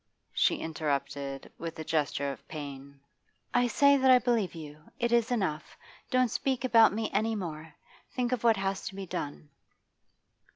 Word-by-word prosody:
she - - +3
interrupted, 140 -3 -3
with 165 -1 -6
a 160 - -5
gesture 145 -3 -1
of 135 - -11
pain. 140 -2 -8 0.5
'I 245 0 +3
say 280 +4 +5
that 265 -1 +3
I 255 - +9
believe 235 -7 0
you. 150 -1 -10
It 240 -3 0
is 235 -1 +3
enough. 190 -11 -2 0.3
Don't 255 -3 +2
speak 265 0 -1
about 230 -3 +6
me 220 +1 -2
any 225 +1 +1
more. 160 -5 -6 0.4
Think 245 -1 0
of 250 -3 -1
what 230 -3 +5
has 195 0 -1
to 195 - -6
be 195 -1 -5
done. 145 -3 -6
195 Hz, 165 wpm, -29 LUFS, 150-240 Hz, 0.5 s, I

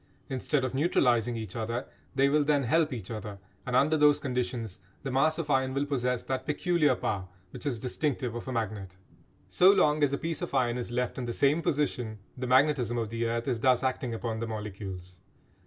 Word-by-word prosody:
Instead 135 +1 0
of 130 - -2
neutralising 125 - +2
each 110 -4 -6
other 115 +3 -2 0.3
they 135 +1 +4
will 150 +1 +3
then 145 -1 +2
help 155 +5 +2
each 115 -6 -6
other, 105 -2 -6 0.3
and 125 - -1
under 145 +4 +4
those 150 -1 +5
conditions 125 -6 -3 0.2
the 135 - -3
mass 155 +5 +2
of 155 -3 -2
iron 130 -1 +1
will 140 +1 +1
possess 125 -3 -1
that 130 -1 -3
peculiar 150 -2 +2
power 95 -5 -2 0.2
which - - -6
is 130 -5 -1
distinctive 125 0 -2
of 120 +1 -6
a - - -3
magnet. 105 -6 -3 0.5
So 185 +2 +6
long 150 -6 +3
as 145 -2 +3
a 140 - 0
piece 165 0 -3
of - - -4
iron 125 -2 +1
is 120 - -4
left 125 +2 -2
in 125 - -3
the 120 - -3
same 145 +6 +3
position 125 -8 -1 0.2
the 125 0 -4
magnetism 130 -2 +3
of 115 -2 -2
the 115 0 -1
earth 115 0 -2
is 120 - 0
thus 130 +1 +3
acting 130 -1 -1
upon 110 -1 -3
the 115 - -3
molecules. 95 -4 -7
125 Hz, 205 wpm, -29 LUFS, 115-145 Hz, 0.5 s, So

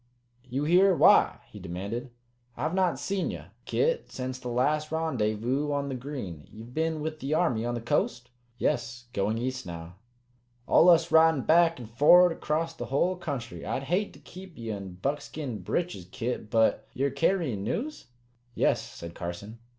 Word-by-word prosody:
You 135 +4 -1
here 180 +4 +5
why?" - - +5
he 105 - -10
demanded. 100 +7 -5 0.5
"I've 160 - -1
not 185 -6 +2
seed 190 +7 -2
ye, - - -6 0.2
Kit, 480 +1 0
sence 130 0 -4
the 125 - -7
last 150 +6 +1
Rendyvous 130 -3 0
on 140 -1 -1
the 135 - -3
Green. 120 - -6
Ye've 115 +3 -11
been 160 0 -1
with 155 0 -4
the 140 +3 -1
Army 125 -10 +1
on 120 - -1
the 120 - -4
coast?" 120 +1 -1 0.3
"Yes. 120 0 -1
Going 105 +3 0
east 130 +2 -3
now." 85 +1 -8 0.7
"Allus 170 -1 +6
ridin' 160 -3 +5
back 165 +3 +4
and 120 - -8
forerd 160 +10 +6
acrost 165 +1 -2
the - - -4
hull 175 +7 +1
country. 140 -9 -5
I'd 135 - -2
hate 180 +9 0
to - - -15
keep 185 -1 -12
ye 115 -2 -5
in 100 -3 -6
buckskin 140 +2 -4
breeches, 170 - -2
Kit. 115 -2 -3
But 115 -1 +2
ye're 140 +1 0
carryin' 140 - 0
news?" 275 - -3 0.5
"Yes," - - +2
said 85 0 -9
Carson. 95 +6 -7
135 Hz, 165 wpm, -28 LUFS, 115-160 Hz, 0.7 s, Allus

